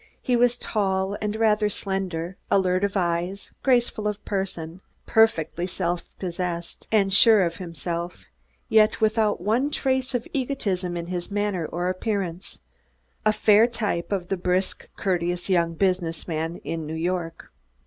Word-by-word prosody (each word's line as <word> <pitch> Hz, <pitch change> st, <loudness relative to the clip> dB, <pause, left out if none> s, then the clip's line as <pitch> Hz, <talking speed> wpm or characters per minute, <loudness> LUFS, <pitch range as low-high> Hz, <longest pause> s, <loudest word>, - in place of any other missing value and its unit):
He 250 Hz, -, +1 dB
was 245 Hz, 0 st, +3 dB
tall 195 Hz, -3 st, 0 dB
and 210 Hz, 0 st, -1 dB
rather 215 Hz, -1 st, +3 dB
slender, 190 Hz, -3 st, -3 dB
alert 185 Hz, -1 st, +2 dB
of 200 Hz, 0 st, 0 dB
eyes, 175 Hz, +2 st, -1 dB
graceful 240 Hz, -5 st, +2 dB
of 210 Hz, 0 st, -4 dB
person; 185 Hz, -3 st, -3 dB, 0.2 s
perfectly 175 Hz, -6 st, +2 dB
self 175 Hz, -1 st, -2 dB
possessed 175 Hz, -2 st, -4 dB
and 200 Hz, -3 st, +3 dB
sure 215 Hz, -1 st, +7 dB
of 165 Hz, -1 st, -3 dB
himself, 170 Hz, 0 st, -5 dB, 0.4 s
yet 215 Hz, 0 st, +4 dB
without 215 Hz, -3 st, +2 dB
one 230 Hz, +9 st, +1 dB
trace 260 Hz, -2 st, 0 dB
of 245 Hz, -, -2 dB
egotism 200 Hz, -10 st, -1 dB
in 170 Hz, 0 st, -5 dB, 0.2 s
manner 200 Hz, -5 st, -1 dB
or 175 Hz, +3 st, -2 dB
appearance 185 Hz, -2 st, -3 dB, 0.7 s
a -, -, +6 dB
fair 215 Hz, +1 st, +5 dB
type 210 Hz, -8 st, -2 dB
of 185 Hz, -3 st, -2 dB
the 195 Hz, -, 0 dB
brisk, 180 Hz, +1 st, -1 dB
courteous 175 Hz, -1 st, -1 dB
young 170 Hz, -2 st, +2 dB
business 180 Hz, -3 st, 0 dB
man 165 Hz, 0 st, -2 dB
of 165 Hz, -, -2 dB
New 160 Hz, 0 st, -5 dB
York. 165 Hz, 0 st, -3 dB
190 Hz, 140 wpm, -25 LUFS, 175-215 Hz, 0.7 s, sure